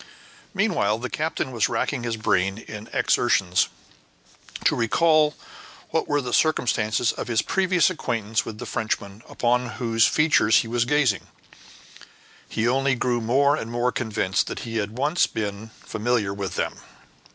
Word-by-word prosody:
Meanwhile 180 Hz, -, +1 dB
the 125 Hz, +2 st, -5 dB
captain 155 Hz, -3 st, -2 dB
was 115 Hz, -4 st, +1 dB
racking 140 Hz, -4 st, -1 dB
his 120 Hz, -1 st, -3 dB
brain 95 Hz, -2 st, +1 dB
in 110 Hz, -1 st, -9 dB
his -, -, -12 dB
exertions 95 Hz, -7 st, +2 dB, 1.0 s
to -, -, +4 dB
recall 150 Hz, +6 st, +3 dB, 0.6 s
what -, -, 0 dB
were 145 Hz, 0 st, +1 dB
the 125 Hz, -2 st, -5 dB
circumstances 120 Hz, -7 st, +2 dB
of -, -, -6 dB
his 115 Hz, -2 st, +1 dB
previous 185 Hz, -2 st, +2 dB
acquaintance 115 Hz, -, -1 dB
with 110 Hz, -, -7 dB
the 120 Hz, -, -7 dB
Frenchman 105 Hz, -2 st, -3 dB
upon 125 Hz, 0 st, 0 dB
whose 115 Hz, -3 st, +3 dB
features 150 Hz, -8 st, +4 dB
he -, -, -7 dB
was 120 Hz, +1 st, 0 dB
gazing; 130 Hz, -7 st, +1 dB, 1.2 s
he 110 Hz, +1 st, 0 dB
only 135 Hz, +2 st, +2 dB
grew 120 Hz, -1 st, 0 dB
more 140 Hz, +5 st, +3 dB
and 115 Hz, -7 st, -5 dB
more 120 Hz, +1 st, 0 dB
convinced 105 Hz, -6 st, -1 dB
that -, -, -5 dB
he 115 Hz, -1 st, -4 dB
had 105 Hz, +2 st, -3 dB
once 150 Hz, +6 st, +2 dB
been 105 Hz, 0 st, -5 dB, 0.2 s
familiar 110 Hz, -3 st, -1 dB
with 100 Hz, -2 st, -5 dB
them. -, -, -2 dB
120 Hz, 150 wpm, -24 LUFS, 110-135 Hz, 1.2 s, to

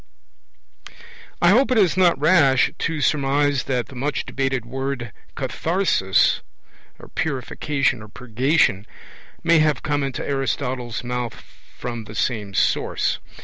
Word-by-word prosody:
I 175 Hz, -, +7 dB
hope 250 Hz, +8 st, +4 dB
it 255 Hz, -, +2 dB
is 190 Hz, -6 st, +4 dB
not 180 Hz, -4 st, +4 dB
rash 145 Hz, -5 st, +4 dB
to 165 Hz, -2 st, -2 dB
surmise 140 Hz, -1 st, +1 dB
that 125 Hz, -3 st, -1 dB
the 135 Hz, -, -14 dB
much 140 Hz, +4 st, -2 dB
debated 135 Hz, -3 st, -2 dB
word 130 Hz, -2 st, -4 dB, 0.2 s
__katharsis__, 165 Hz, -, +1 dB, 0.7 s
'purification' 135 Hz, -2 st, -1 dB
or 105 Hz, -, -10 dB
'purgation', 125 Hz, -1 st, 0 dB, 0.6 s
may 170 Hz, -1 st, +5 dB
have 155 Hz, -2 st, +1 dB
come 145 Hz, -1 st, 0 dB
into 135 Hz, -2 st, -3 dB
Aristotle's 130 Hz, -3 st, -2 dB
mouth 125 Hz, -1 st, -3 dB, 0.4 s
from 120 Hz, -2 st, -5 dB
the 105 Hz, -, -10 dB
same 105 Hz, -4 st, -2 dB
source. -, -, +1 dB
135 Hz, 120 wpm, -22 LUFS, 120-150 Hz, 0.7 s, I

